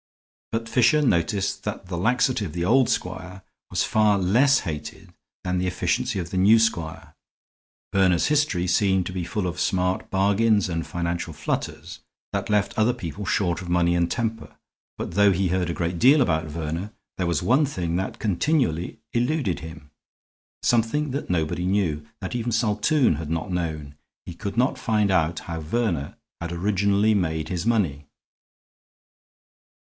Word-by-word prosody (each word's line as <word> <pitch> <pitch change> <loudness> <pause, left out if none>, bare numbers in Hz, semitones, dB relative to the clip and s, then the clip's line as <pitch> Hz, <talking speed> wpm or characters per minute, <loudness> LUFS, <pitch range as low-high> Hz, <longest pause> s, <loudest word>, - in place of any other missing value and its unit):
But 115 0 -2
Fisher 125 +5 +3
noticed 95 - 0
that - - -5
the 90 -1 -5
laxity 120 +5 +1
of 85 -7 -5
the 85 0 -2
old 125 +5 +4
squire 90 +1 -4 0.3
was - - 0
far 105 -2 +3
less 120 +10 +3
hated 75 -2 -7 0.3
than 90 0 -1
the 90 - -1
efficiency 90 - -1
of 85 -3 -4
the 95 - -2
new 105 +4 +6
squire. 85 -8 -1 0.8
Verner's 95 -3 +3
history 145 -12 +1
seemed 95 0 +2
to - - -4
be 90 -1 -3
full 100 +3 -3
of 90 -1 -3
smart 90 0 0
bargains 100 +1 +2
and 85 -1 -3
financial 85 -1 -3
flutters 75 0 -4 0.3
that 100 +1 -2
left 105 -1 +1
other 120 +3 +3
people 95 -1 -6
short 90 -3 0
of 90 - -8
money 85 0 +2
and 85 0 +1
temper. 115 -1 -3 0.4
But - - -4
though 100 +3 +4
he 95 0 +1
heard 90 -1 0
a - - -1
great 85 0 -2
deal 140 - +6
about 80 - +1
Verner, 80 +6 -4 0.3
there 90 - 0
was 85 -3 0
one 140 +4 +3
thing 85 -10 -3
that 95 - -3
continually 105 - 0 0.2
eluded 120 - 0
him; 80 -2 -11 0.7
something 120 +5 +1
that 140 - -4
nobody 90 +1 -1
knew, 85 -7 0
that 95 - -5
even 120 0 -2
Saltoun 115 - +2
had 80 -1 -6
not 80 +2 -3
known. 80 -5 -3 0.3
He 90 - -7
could 100 +5 -6
not 130 +2 +2
find 105 -5 +1
out 85 -2 +1
how 85 -1 -5
Verner 85 -4 -1 0.2
had 85 0 -5
originally 100 +4 +2
made 80 -5 -1
his 90 +4 -3
money. 85 -12 0
95 Hz, 165 wpm, -24 LUFS, 85-110 Hz, 0.8 s, new